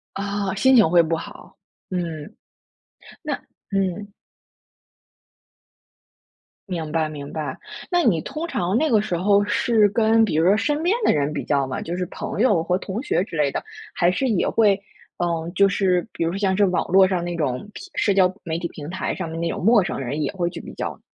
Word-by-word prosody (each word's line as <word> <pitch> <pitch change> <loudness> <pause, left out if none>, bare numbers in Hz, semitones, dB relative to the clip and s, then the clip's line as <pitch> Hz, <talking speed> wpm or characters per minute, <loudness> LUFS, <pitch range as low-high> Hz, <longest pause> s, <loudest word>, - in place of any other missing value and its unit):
哦， 200 -1 -2
心 260 +5 +4
情 215 -7 +6
会 170 +1 +5
不 165 0 -1
好， - - -10 0.3
嗯。 170 +1 -4 0.9
那 - - -2 0.4
嗯。 195 +1 -2 2.6
明 165 -4 -4
白 160 -1 +1
明 145 -2 -8
白， 150 -4 -4 0.3
那 350 -1 +3
你 175 -9 +3
通 310 +4 -5
常 185 - -1
那 315 +4 +2
个 220 -5 +4
时 180 - -2
候 200 +3 +3
是 220 0 +3
跟 225 +2 +3
比 195 - -1
如 160 +2 +3
说 200 +3 +5
身 295 +7 0
边 360 +5 +2
的 - - +5
人 145 0 0
比 - - -4
较 140 -2 +1
吗？ 130 - -4
就 175 +2 -4
是 180 -1 -2
朋 200 - -5
友 205 -10 +3
和 180 +2 0
同 195 +4 -5
学 280 - +1
之 165 - -8
类 150 -2 +2
的。 - - -3 0.3
还 175 0 +3
是 265 +8 -1
也 215 -7 +1
会 205 -3 +3 0.4
嗯， 170 -1 -2
就 200 +1 +5
是 180 -2 +1
比 165 - -2
如 170 +3 -1
像 195 -2 +1
是 205 - +4
网 180 -1 0
络 190 +1 +6
上 180 -2 -1
那 175 0 -3
种 140 +2 -2
平 390 - -10
社 200 - +2
交 185 -1 +4
媒 165 -2 -2
体 170 -1 -3
平 150 -1 -9
台 190 - -3
上 185 -3 -4
面 165 +1 -5
的 170 - -1
那 - - 0
种 - - -5
陌 225 -1 +6
生 - - -3
人 135 +4 -3
也 - - -1
会 175 -3 -1
去 170 -1 -8
比 - - -9
较 - - -3
啊。 - - -19
185 Hz, 225 characters per minute, -22 LUFS, 165-205 Hz, 2.6 s, 情